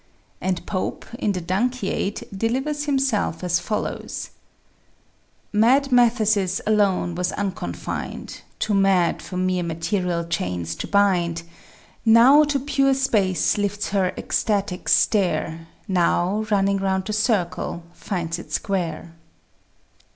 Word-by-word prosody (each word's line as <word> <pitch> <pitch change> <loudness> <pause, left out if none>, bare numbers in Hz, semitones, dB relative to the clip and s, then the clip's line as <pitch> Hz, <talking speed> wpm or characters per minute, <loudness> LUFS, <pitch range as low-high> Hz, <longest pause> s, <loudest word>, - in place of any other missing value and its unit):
And 185 -2 -2
Pope 185 -3 -3
in 205 - 0
the 180 - -3
"Dunciad" 200 +2 -1
delivers 265 +8 -1
himself 265 - 0
as 175 -1 +1
follows: 210 +4 -4 1.2
Mad 260 +6 +4
Mathesis 215 -6 +3
alone 200 -5 +2
was 180 +1 -1
unconfined, 190 - -5 0.2
Too 215 - -1
mad 195 -3 +3
for 180 - -7
mere 185 0 0
material 170 +1 -1
chains 90 - -2
to - - -4
bind, 175 -5 +2 0.6
Now 240 +6 +7
to 290 -1 0
pure 275 0 +2
space 210 -8 +1
lifts 205 0 -1
her 195 -2 +1
ecstatic 200 -4 -1
stare, 165 -5 +1 0.2
Now, 185 +3 +1
running 200 -1 +2
round 190 -1 -1
the 215 - -3
circle, 190 -5 -1
finds 170 -3 -4
it - - -11
square. 170 -4 -2
195 Hz, 115 wpm, -23 LUFS, 175-220 Hz, 1.2 s, Now